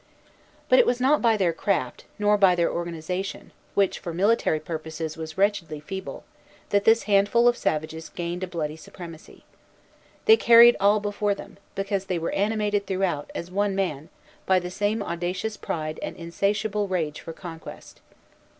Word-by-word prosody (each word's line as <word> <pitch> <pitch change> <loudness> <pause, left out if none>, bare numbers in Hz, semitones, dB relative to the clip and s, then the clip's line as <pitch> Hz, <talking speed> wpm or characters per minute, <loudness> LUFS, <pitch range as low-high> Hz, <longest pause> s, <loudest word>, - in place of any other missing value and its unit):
But - - +6
it 485 - +5
was 245 - +1
not 275 +4 +3
by 230 -2 +3
their 180 -4 +1
craft, 160 -8 -2
nor 210 0 +3
by 195 -3 +5
their 170 -1 +1
organization, 175 +3 -4 0.2
which 200 -2 +2
for 170 -2 -6
military 195 -4 +2
purposes 160 0 -5
was 160 0 -7
wretchedly 190 -6 0
feeble, 190 +6 -7 0.5
that 200 0 +2
this 225 +1 +5
handful 205 +4 +3
of 240 - +4
savages 160 -3 -3
gained 175 +1 -4
a - - -2
bloody 160 -3 -4
supremacy. 165 0 -12 0.8
They 445 0 +7
carried 235 - +8
all 205 +2 +4
before 205 0 -1
them, 195 - -12 0.2
because 195 0 -2
they 185 -2 -1
were 165 - -2
animated 205 -1 0
throughout, 185 -6 -1
as 170 +2 -5
one 200 +1 0
man, 165 -6 -2 0.4
by 190 - +5
the 180 0 -3
same 205 +3 -1
audacious 180 +5 -3
pride 155 -5 -4
and - - -5
insatiable 200 +4 -1
rage 165 -6 -2
for - - -7
conquest. 165 0 -10
190 Hz, 160 wpm, -25 LUFS, 165-205 Hz, 0.8 s, carried